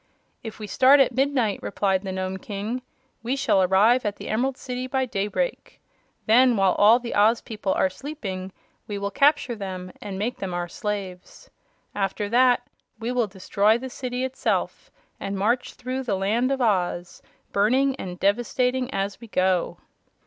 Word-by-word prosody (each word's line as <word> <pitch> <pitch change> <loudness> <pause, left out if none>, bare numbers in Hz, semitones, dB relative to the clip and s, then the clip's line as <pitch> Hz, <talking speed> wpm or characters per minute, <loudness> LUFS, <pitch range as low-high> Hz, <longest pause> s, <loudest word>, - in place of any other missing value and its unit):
"If 225 -2 -8
we 215 - -6
start 265 +7 +5
at 260 -2 +4
midnight," 260 -5 +1
replied 195 -2 0
the 190 -1 -5
Nome 185 0 -3
King, 210 +5 -4 0.4
"we 245 +3 -1
shall 270 -8 +2
arrive 205 +7 +4
at 205 -1 -2
the - - -8
Emerald 255 +4 0
City 255 0 -5
by 265 0 0
daybreak. 230 - -3 0.5
Then, 245 +1 +5
while 195 -1 +4
all 215 +3 +6
the 245 -1 -5
Oz 220 +3 +4
people 210 -3 -4
are - - +3
sleeping, 190 -5 -6 0.4
we 205 - -4
will 200 0 -3
capture 285 0 +3
them 185 -3 -6
and 200 -2 -6
make 220 +5 -2
them 185 -2 -4
our 175 0 -2
slaves. 190 -1 -6 0.4
After 205 +1 -2
that 245 +1 +3 0.3
we 235 +1 -3
will 245 -3 +1
destroy 200 +3 +1
the 260 +1 -7
city 250 0 -4
itself 260 0 -2 0.3
and 195 0 -4
march 235 +6 0
through 255 +1 -4
the 235 -6 -1
Land 225 +7 +1
of 270 -1 -1
Oz, 180 -5 -1 0.3
burning 260 +7 +2
and 180 -5 -7
devastating 250 +5 +1
as 195 +2 -3
we 230 - -10
go." 185 -3 +1
215 Hz, 165 wpm, -24 LUFS, 195-250 Hz, 0.5 s, all